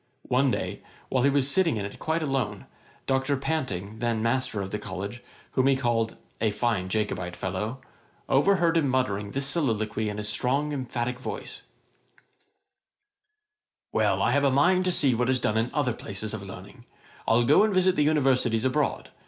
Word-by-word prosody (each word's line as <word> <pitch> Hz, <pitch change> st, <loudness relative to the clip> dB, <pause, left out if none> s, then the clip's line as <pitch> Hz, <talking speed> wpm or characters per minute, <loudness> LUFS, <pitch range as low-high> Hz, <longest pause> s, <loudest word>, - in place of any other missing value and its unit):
One 130 Hz, +2 st, +3 dB
day, -, -, -3 dB, 0.3 s
while 130 Hz, -, +1 dB
he 140 Hz, -, +5 dB
was 140 Hz, -1 st, +3 dB
sitting 165 Hz, -, +3 dB
in 100 Hz, -, -3 dB
it 100 Hz, -, -8 dB
quite 160 Hz, +1 st, -1 dB
alone, 125 Hz, -9 st, -2 dB, 0.4 s
Dr. 135 Hz, +1 st, +1 dB
Panting, 110 Hz, -, -3 dB
then 115 Hz, -2 st, 0 dB
master 125 Hz, -2 st, 0 dB
of 95 Hz, -1 st, -4 dB
the 105 Hz, -, -2 dB
College, 100 Hz, +3 st, -6 dB, 0.3 s
whom 130 Hz, 0 st, +2 dB
he 135 Hz, -, +4 dB
called 115 Hz, -3 st, 0 dB, 0.2 s
'a 110 Hz, -, +3 dB
fine 105 Hz, -3 st, -1 dB
Jacobite 95 Hz, -4 st, -2 dB
fellow,' 100 Hz, +7 st, -3 dB, 0.5 s
overheard 170 Hz, +3 st, +3 dB
him 140 Hz, -5 st, +2 dB
uttering 105 Hz, -6 st, 0 dB
this 135 Hz, +6 st, -1 dB
soliloquy 110 Hz, -7 st, 0 dB
in 105 Hz, -, -5 dB
his 105 Hz, 0 st, -3 dB
strong, 140 Hz, +7 st, 0 dB
emphatick 125 Hz, -2 st, -3 dB
voice: -, -, -6 dB, 2.3 s
'Well, -, -, +2 dB
I -, -, +3 dB
have 145 Hz, -, +2 dB
a 140 Hz, -, +5 dB
mind 180 Hz, +8 st, +3 dB
to 180 Hz, -, +2 dB
see 140 Hz, -6 st, +3 dB
what 120 Hz, +2 st, 0 dB
is 130 Hz, -1 st, +2 dB
done 105 Hz, -2 st, 0 dB
in 115 Hz, +2 st, +1 dB
other 135 Hz, -5 st, 0 dB
places 105 Hz, -1 st, -5 dB
of 110 Hz, -, -4 dB
learning. 100 Hz, +5 st, -11 dB, 0.4 s
I'll 115 Hz, +1 st, +4 dB
go -, -, +6 dB
and 215 Hz, 0 st, +3 dB
visit 185 Hz, -1 st, +3 dB
the -, -, +2 dB
Universities 130 Hz, -6 st, +2 dB
abroad. 140 Hz, +3 st, 0 dB
125 Hz, 175 wpm, -26 LUFS, 105-140 Hz, 2.3 s, go